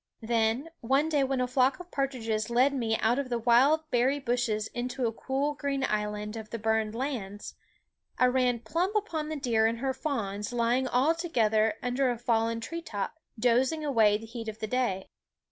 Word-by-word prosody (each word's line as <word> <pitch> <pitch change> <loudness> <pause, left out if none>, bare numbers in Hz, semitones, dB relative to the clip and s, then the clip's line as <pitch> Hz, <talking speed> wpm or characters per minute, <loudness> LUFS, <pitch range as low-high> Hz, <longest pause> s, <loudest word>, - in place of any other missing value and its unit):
Then, 230 +5 +1
one 270 +6 +1
day 295 -3 +2
when 265 -1 0
a 250 - +1
flock 255 +2 +2
of 360 0 -11
partridges 230 -6 -1
led 255 +4 +3
me 230 -4 0
out 235 +4 +2
of 275 -2 -3
the 240 - 0
wild 250 +7 +4
THE - - -34
WOODS - - -41
berry 255 +4 +2
bushes 240 -4 -1
into 250 +1 -3
a 225 - +1
cool 270 +5 -2
green 280 -2 -2
island 210 -1 -2
of 220 -1 -7
the 230 - -4
burned 220 0 0
lands, 230 -6 -4 0.6
I 255 - +4
ran 250 -2 +2
plump 355 - -1
upon 325 -8 -1
the 315 - -3
deer 235 -6 +2
and 230 +1 -1
her 265 +2 -1
fawns 210 -8 -3
lying 240 +2 +1
all 260 +6 +3
together 220 -10 +1
under 250 +1 +1
a 240 - -1
fallen 230 -1 0
tree 335 +8 -5
top, 295 - -5 0.2
dozing 255 +7 +2
away 220 -7 +4
the 225 - -10
heat 230 0 -7
of 220 -1 -5
the 220 - -3
day. 215 -5 -1
245 Hz, 195 wpm, -29 LUFS, 225-275 Hz, 0.6 s, wild